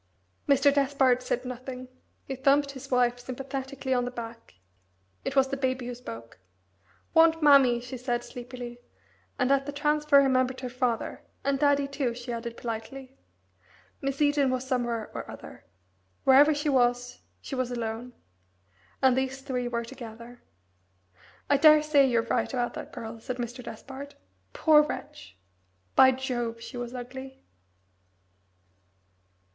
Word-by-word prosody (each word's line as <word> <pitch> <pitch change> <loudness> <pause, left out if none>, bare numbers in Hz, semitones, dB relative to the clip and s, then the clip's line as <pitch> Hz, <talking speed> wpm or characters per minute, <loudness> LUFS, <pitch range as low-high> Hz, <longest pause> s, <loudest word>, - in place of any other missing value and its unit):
Mr. 280 0 +5
Despard 270 -3 +3
said 250 0 -2
nothing. 255 0 -7 0.4
He 270 - -4
thumped 280 +2 +3
his 265 -2 -10
wife 245 -1 +2
sympathetically 265 +1 -4
on 250 -1 +1
the 245 - -2
back. 230 - -9 0.7
It 270 - -3
was 270 -1 +4
the 275 - -2
baby 260 -2 -1
who 245 - -4
spoke. 115 - -10 0.7
"Want 325 -1 +5
mammy," 275 -5 +6
she 245 +2 -7
said 240 -1 -2
sleepily, 245 -1 -8 0.6
and 250 +1 +1
at 275 0 +2
the - - -2
transfer 295 0 +3
remembered 260 -2 +3
her 250 - -4
father, 245 -2 -2 0.2
"and 275 -1 0
daddy 285 -1 +3
too," 275 -4 -2
she 245 0 -6
added 235 0 -5
politely. 250 +4 -6 0.9
Miss 275 +2 0
Eden 290 -2 +3
was 255 0 -2
somewhere 240 -3 -1
or - - -6
other. - - -11 0.6
Wherever 280 +3 +7
she 295 +1 -2
was 245 -2 +1 0.2
she - - -9
was 255 -2 -1
alone. 235 0 -4 0.9
And 260 -2 +5
these 265 +1 -2
three 250 -3 -2
were 235 -1 -2
together. 235 -1 -10 1.1
"I 285 - +4
daresay 300 -1 +6
you're 235 -3 +2
right 230 - -1
about 245 -2 -1
that - - -8
girl," 225 0 -7
said 250 +2 -5
Mr. 245 +1 -5
Despard. 270 +5 -9 0.4
"Poor 300 - +5
wretch! 100 - -7 0.6
By 260 - +8
Jove, 240 -3 -3
she 240 - -9
was 245 -1 -5
ugly!" 260 +2 -8
255 Hz, 140 wpm, -28 LUFS, 240-275 Hz, 1.1 s, By